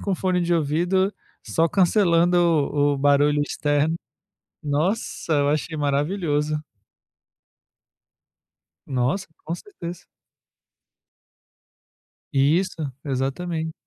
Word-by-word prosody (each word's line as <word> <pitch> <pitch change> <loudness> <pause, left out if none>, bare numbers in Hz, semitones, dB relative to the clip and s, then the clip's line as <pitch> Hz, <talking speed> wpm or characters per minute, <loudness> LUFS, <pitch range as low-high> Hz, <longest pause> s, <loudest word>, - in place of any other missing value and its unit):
com 200 - -2
o - - +2
fone 185 -1 0
de 175 0 +1
ouvido 175 +6 +1 0.3
só 165 +1 +2
cancelando 175 -3 +3
o 145 -4 +2
barulho 145 +1 +3
externo. 145 +2 0 0.7
Nossa, 160 +4 -1
eu 145 -1 +2
achei 155 +1 -1
maravilhoso. 150 +1 0 2.3
Nossa, 135 +9 -1 0.2
com 165 +2 -3
certeza. 175 - -9 2.3
Isso, 155 +2 +1
exatamente. 160 +4 -2
160 Hz, 80 wpm, -23 LUFS, 145-175 Hz, 2.3 s, cancelando